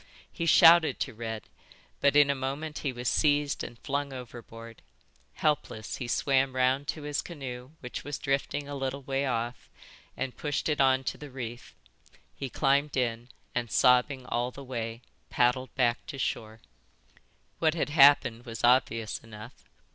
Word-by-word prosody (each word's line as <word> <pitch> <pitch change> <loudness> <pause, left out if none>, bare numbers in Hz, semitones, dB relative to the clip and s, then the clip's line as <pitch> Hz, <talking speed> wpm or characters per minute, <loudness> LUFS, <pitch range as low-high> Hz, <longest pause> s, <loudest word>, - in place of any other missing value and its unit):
He 170 - -3
shouted 165 0 +7
to 130 - -2
Red, 110 -1 -5 0.6
but 140 0 +3
in 145 -1 +6
a - - +1
moment 140 +3 -4
he 140 - -2
was 125 0 -5
seized 145 0 +2
and 120 - -8
flung 140 +3 -3
overboard. 115 -2 -10 0.5
Helpless, 145 -8 -1
he 125 - -5
swam 135 +1 +1
round 130 +2 +1
to 155 - -4
his 145 -3 -2
canoe 135 -4 -8
which 125 - -6
was 145 0 -4
drifting 140 +1 -2
a 145 - -6
little 135 0 -3
way 135 +1 -1
off, 120 -1 -3 0.5
and 130 0 -3
pushed 145 -1 -2
it 150 -2 +1
on 130 0 +4
to - - -4
the 150 - -9
reef. 120 -2 -8 0.6
He 135 - -6
climbed 140 +2 +1
in 120 -1 -1 0.2
and, 120 -2 -2
sobbing 125 +2 +3
all 120 +1 -1
the 140 +2 -10
way, 115 -2 -5 0.3
paddled 125 +1 +1
back 120 -2 +1
to 140 - -6
shore." 110 -4 -3 1.0
"What 160 0 +2
had 160 - -1
happened 140 -5 +5
was 115 -1 -7
obvious 115 -3 +2
enough. 110 -1 -13
130 Hz, 160 wpm, -28 LUFS, 120-140 Hz, 1.0 s, shouted